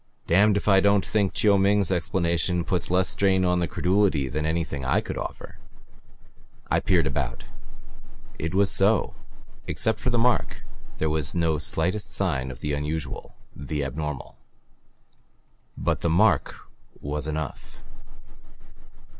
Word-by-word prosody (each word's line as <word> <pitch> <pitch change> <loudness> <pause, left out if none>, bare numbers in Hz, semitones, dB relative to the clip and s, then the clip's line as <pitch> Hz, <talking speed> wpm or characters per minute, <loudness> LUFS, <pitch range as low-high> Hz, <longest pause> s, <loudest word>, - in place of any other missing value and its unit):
Damned 100 +4 +4
if 100 - -4
I 95 -2 +6
don't 100 0 +3
think 100 -3 0
Chiu 100 -2 +4
Ming's 100 -1 +2
explanation 85 -1 0
puts 90 +1 -1
less 90 +1 +2
strain 95 -1 +2
upon 90 -1 +2
the 85 - 0
credulity 90 -7 +1
than 75 +3 -2
any 80 +1 0 0.2
I 65 - +2
could - - -5
offer." - - -7 1.1
I - - +3
peered - - +2
about. 65 -4 -3 1.0
It 80 +3 -3
was 100 0 +3
so. 100 +3 +3 0.5
Except 110 -1 0
for 125 - -1
the 120 - +1
mark, 120 +1 +1 0.3
there 80 - 0
was 75 -1 -1
no 80 -3 +1
slightest 90 +7 -1
sign 70 -10 -1
of 65 - -9
the 75 - -2
unusual, 75 +2 -4 0.2
the 75 +1 -4
abnormal. 75 +1 -5 1.4
But - - -1
the 85 - +1
mark 100 +7 +3 0.4
was 75 +1 -4
enough! 75 -5 -5
85 Hz, 140 wpm, -25 LUFS, 75-100 Hz, 1.4 s, I